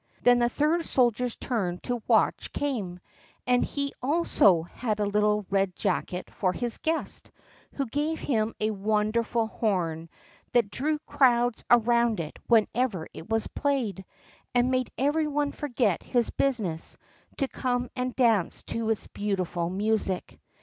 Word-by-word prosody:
Then 245 0 +6
the 240 0 +3
third 310 +6 +1
soldier's 245 -3 +1
turn 190 -8 -2
to 245 -1 -1
watch - - +2
came; 215 -11 -3 0.5
and 250 0 +3
he 280 -1 -3
also 255 - +3
had 215 +5 -3
little 210 0 +1
Red 195 -2 +1
jacket 185 -2 -2
for 185 -2 0
his 240 +2 0
guest, 320 0 -1 0.4
who 275 - -2
gave 295 +6 -2
him 225 -4 0
a 215 +1 +1
wonderful 215 +3 0
horn, 175 -7 -2 0.4
that 235 -5 +3
drew 300 +3 0
crowds 245 -5 +2
around 235 -2 +4
it 155 -2 -6
whenever 225 -5 +2
it 165 - -10
was 225 -1 +1
played, 250 - -1 0.5
and 245 +1 +3
made 255 -1 0
every 300 +3 +1
one 290 -1 0
forget 245 - 0
his 240 -3 +1
business 210 -12 0 0.4
to 275 - 0
come 245 -2 -1
and 250 0 -2
dance 225 -8 +2
to 230 -1 0
its 225 - -1
beautiful 185 -4 -2
music. 200 -1 -1
230 Hz, 140 wpm, -27 LUFS, 205-255 Hz, 0.5 s, Then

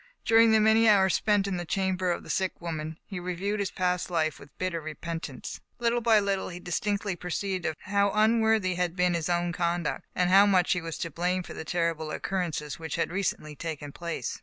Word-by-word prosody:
During 225 0 +6
the 220 - +5
many 220 +1 +5
hours 190 -3 +5
spent 205 -2 +2
in 195 -2 -2
the 175 - -3
chamber 185 +1 0
of 175 - -1
the - - -12
sick 190 -1 -1
woman, 160 -2 -5
he 195 -3 -6
reviewed 180 +4 -2
his 200 -2 0
past 180 -1 -1
life 160 -3 0
with 140 - -13
bitter 180 -3 -2
repentance. 155 -3 -6 0.2
Little 240 0 +1
by 225 -2 +5
little 200 -1 -1
he 175 -1 -7
distinctly 200 +2 -1
perceived 180 +1 -3
how 200 0 +2
un 215 +3 +3
worthy 220 -4 +2
had 175 -1 -1
been 180 -1 +2
his 170 -1 -1
own 175 0 0
conduct, 170 -1 -1
and 180 0 +2
how 200 +2 +7
much 185 -3 +3
he 180 - +1
was 165 -1 -5
to 170 - -4
blame 180 +3 -1
for - - -9
the - - -6
terrible 165 -2 -1
occurrences 160 -5 -3
which 160 -1 -4
had - - -1
recently 180 -5 -2
taken 150 -2 -5
place. 170 -6 -4
180 Hz, 210 wpm, -28 LUFS, 170-200 Hz, 0.2 s, how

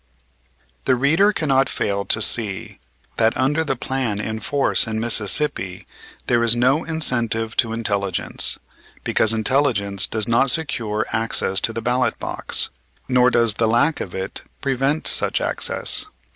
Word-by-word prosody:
The 130 - +3
reader 160 +11 +3
cannot 135 -8 +1
fail 100 -1 -2
to 110 - +4
see 105 -4 +1 0.4
that 115 0 +2
under 145 +5 +1
the 140 -4 -2
plan 125 -4 -3
in 110 +1 -4
force 140 -1 +1
in 110 0 -3
Mississippi 110 - 0 0.4
there 120 -1 +1
is 115 0 +4
no 130 +6 +2
incentive 120 -8 -1
to 115 - +2
intelligence; 100 -5 -1 0.5
because 110 - +2
intelligence 110 -4 +1
does 110 -2 -1
not 120 +3 +2
secure 115 -9 0
access 110 -4 +1
to - - +1
the 115 0 -6
ballot 125 +2 0
box, - - -1 0.4
nor 125 -1 +3
does 115 -3 +2
the 115 +2 0
lack 120 +8 +1
of 90 - -7
it 95 0 -5 0.2
prevent 135 +3 -1
such - - +2
access. - - 0
115 Hz, 145 wpm, -20 LUFS, 110-135 Hz, 0.5 s, to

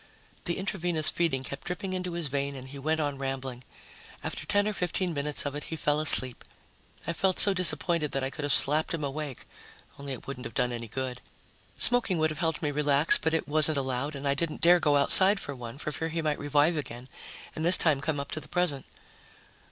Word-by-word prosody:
The 170 - -2
intravenous 175 -5 -1
feeding 155 -7 -1
kept 140 +1 -8
dripping 185 +2 -5
into 180 -1 -4
his 170 -3 -2
vein 140 +1 -3
and 130 -1 -10
he 140 +1 -9
went 155 +3 -1
on 145 -3 -3
rambling. 135 -2 -5 0.6
After - - -6
ten 205 0 +1
or 215 - -2
fifteen 180 -1 -2
minutes 145 0 -1
of 145 - -3
it, 145 +1 -7
he 160 - -6
fell 150 -1 0
asleep. 130 -5 +7 0.6
I 170 - -3
felt 190 +2 0
so 200 - +4
disappointed 170 -3 +1
that 135 - -2
I 135 - -3
could 150 - -8
have 145 0 -1
slapped 155 +4 +5
him 155 - -6
awake, 145 -1 -6 0.5
only 140 -1 -6
it 130 - -10
wouldn't 130 -3 -8
have 115 - -15
done 125 - 0
any 115 -1 -6
good. 125 +2 -5 0.6
Smoking 245 -7 +2
would 155 0 0
have 155 - -7
helped 160 -1 -2
me 150 - -1
relax, 145 +1 +4
but 160 0 -1
it 160 - -2
wasn't 155 0 +2
allowed, 135 +2 -3
and 140 +1 -5
I 140 - +2
didn't 155 +2 -4
dare 175 +1 +5
go 150 -3 +1
outside 190 +8 +4
for 145 - -7
one, 120 -1 -9
for 150 - -5
fear 160 +2 -4
he 165 0 -4
might 150 -1 -2
revive 145 +3 +1
again 125 -4 -7 0.5
and 160 - -5
this 175 +2 +8
time 150 -5 +1
come 150 -1 -2
up 140 - -7
to - - -3
the - - -12
present. 175 -7 -1
150 Hz, 220 wpm, -27 LUFS, 140-165 Hz, 0.6 s, this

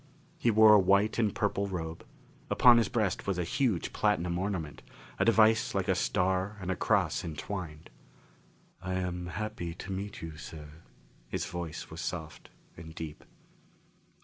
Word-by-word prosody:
He 120 - +2
wore 110 -1 +7
a 105 - +8
white 100 +4 +3
and 110 -3 +2
purple 100 -1 0
robe; 80 -4 -5 0.5
upon 120 -1 +7
his 115 - +1
breast 105 -6 -1
was 95 -2 0
a 90 - 0
huge 110 - 0
platinum 90 -4 +1
ornament, 90 -6 -3 0.4
a - - +3
device 110 +1 +4
like - - 0
a - - +3
star 95 +3 0
and 95 -1 -3
cross - - +1
entwined. 80 0 -6 0.9
"I 95 0 -3
am 90 -1 -3
happy 90 -2 -4
to 95 - -8
meet 100 0 -5
you, 80 -2 -7
sir." 75 -2 -9 0.6
His - - -3
voice 85 -3 -6
was - - -6
soft - - -6 0.3
and 80 0 -11
deep. 80 -3 -7
95 Hz, 150 wpm, -30 LUFS, 85-105 Hz, 0.9 s, a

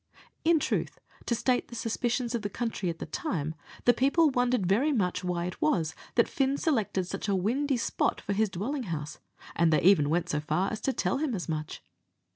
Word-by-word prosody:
In 330 0 +4
truth, - - -2 0.3
to 235 - +2
state 245 +2 +1
the 240 - -10
suspicions 235 +1 -1
of 235 - -1
the 205 - -3
country 225 -4 -2
at 165 - -4
the - - -5
time, 165 - -3 0.3
the 245 - +7
people 280 +6 +3
wondered 245 -5 +1
very 230 +12 +3
much 185 -7 0
why 175 -1 -1
it 180 - -6
was 155 +1 +1 0.2
that 235 - +4
Fin 275 0 0
selected 220 - 0
such 195 +3 -5
a 200 - +2
windy 255 +9 +1
spot 230 - 0
for 200 - -3
his 215 +1 +2
dwelling 240 +9 -3
house, 150 -2 -4 0.4
and 170 -1 +3
they 155 - +3
even 170 -6 +5
went 170 +2 +1
so 150 - 0
far 155 +6 0
as 215 - -4
to 270 - +1
tell - - 0
him 290 -6 -1
as 180 - -4
much. 155 -2 -4
215 Hz, 210 wpm, -29 LUFS, 175-250 Hz, 0.4 s, the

